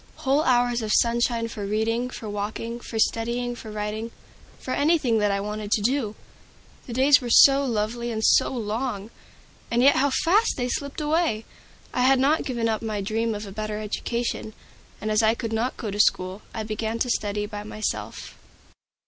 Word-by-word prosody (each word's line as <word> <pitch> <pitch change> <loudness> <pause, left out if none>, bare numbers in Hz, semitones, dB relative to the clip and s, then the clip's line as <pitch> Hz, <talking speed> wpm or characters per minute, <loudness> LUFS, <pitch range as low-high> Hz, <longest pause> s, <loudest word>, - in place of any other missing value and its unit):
Whole 275 +2 +1
hours 245 -3 +2
of 215 -1 -3
sunshine 235 0 +2
for 215 -2 -6
reading, 225 +4 -1
for 230 -3 -8
walking, 210 +3 -4
for 230 - -7
studying, 235 +2 0
for 225 - -9
writing, 210 +2 -4 0.5
for 255 - -5
anything 285 -7 +2
that 210 -1 +2
I 200 0 0
wanted 210 +1 -4
to 215 - +2
do! 235 -3 0 0.7
The 240 - -6
days 275 +3 +5
were 245 - -5
so 275 +3 +7
lovely 235 -1 -2
and 220 -1 -3
so - - +5
long! 225 -2 -3 0.6
and 240 +1 +2
yet 280 - +6
how 285 +2 +3
fast 385 +11 +2
they 250 -1 -1
slipped 280 +4 -3
away! 300 -7 0 0.5
I - - 0
had 265 +2 +5
not 290 +4 +2
given 235 -3 -1
up 220 -1 -1
my 215 -2 -3
dream 220 +3 -1
of 210 +1 -6
a 195 - -9
better 215 +1 -4
education, 220 +1 -3 0.5
and 215 - -3
as 215 +1 +3
I 220 +1 +3
could 230 -1 -4
not 235 +3 -1
go 215 -4 -4
to 205 - -5
school, 185 -1 +2
I 220 - -4
began 220 +1 -3
to 245 +2 -1
study 210 -1 -1
by 205 0 -6
myself. 215 +1 -5
230 Hz, 185 wpm, -25 LUFS, 215-250 Hz, 0.7 s, so